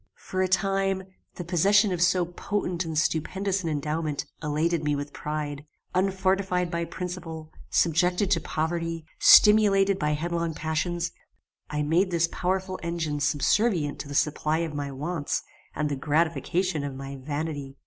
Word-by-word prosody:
"For 185 - -3
a 185 - +2
time 195 0 +1 0.3
the 175 - -5
possession 195 +5 +3
of 175 -2 -2
so 180 0 +3
potent 180 0 -3
and 160 -1 -4
stupendous 190 +5 0
an 170 - -2
endowment 150 0 -2 0.2
elated 155 +2 0
me 150 -1 +1
with 145 0 -5
pride. 150 -1 -4 0.3
Unfortified 190 -1 +1
by 170 0 -1
principle, 170 -2 -6 0.2
subjected 180 +4 +2
to 165 -4 +3
poverty, 165 0 -2
stimulated 200 -2 +6
by 150 0 +1
headlong 170 +1 -2
passions, 165 +3 -1 0.6
I 150 0 -1
made 170 +6 +2
this 170 -1 +2
powerful 185 +1 -2
engine 165 -3 -2
subservient 150 +3 +1
to - - -6
the 145 - -6
supply 150 +1 +1
of 160 - -6
my 145 -1 -3
wants, 145 +3 -2 0.3
and 150 - 0
the 145 - -2
gratification 160 +3 0
of 140 -2 -4
my 135 +1 -7
vanity. 145 0 -4
165 Hz, 150 wpm, -26 LUFS, 150-185 Hz, 0.6 s, stimulated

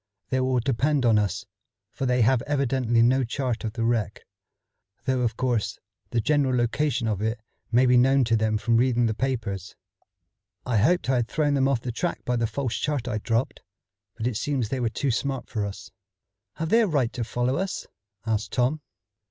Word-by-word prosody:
"They 130 - +1
will 130 -1 +1
depend 135 +3 +1
on 110 -3 +5
us, 100 -3 -2 0.5
for 135 - -3
they 125 0 +2
have 125 +1 +3
evidently 130 -5 +2
no 130 +3 +3
chart 125 -1 -2
of 110 -1 -3
the 115 -1 -2
wreck, 115 -3 -1 0.8
though 130 -2 +1
of 115 -2 -1
course 115 -6 0 0.3
the 120 - 0
general 135 +1 +2
location 120 +1 0
of 105 -3 -1
it 110 +2 -1 0.3
may 125 +2 +5
be 125 0 +5
known 135 +2 +4
to 115 -1 +2
them 110 -1 +1
from 115 +2 +2
reading 120 -1 +3
the 110 - +1
papers. 110 -7 -3 0.9
I 125 -3 +1
hoped 175 - +2
I 130 -1 +2
had 120 -2 0
thrown 145 0 +1
them 135 -1 +3
off 135 -4 +1
the 125 - -4
track 170 +9 -3
by 125 - 0
the 115 -1 +1
false 120 +1 -2
chart 145 -5 -2
I 110 -3 -1
dropped, 115 +3 -1 0.6
but 110 - -4
it 120 -4 0
seems 130 -4 -1
they 130 - -2
were 120 -2 +1
too 135 +4 -1
smart 135 +1 -2
for 105 -3 -1
us." 95 -1 -9 0.6
"Have 160 0 -3
they 230 +4 +5
a 220 - +2
right 140 -9 0
to 125 - -3
follow 120 +3 -1
us?" 190 +1 -3 0.4
asked 110 -2 -1
Tom. 130 +5 +1
125 Hz, 200 wpm, -25 LUFS, 115-135 Hz, 0.9 s, on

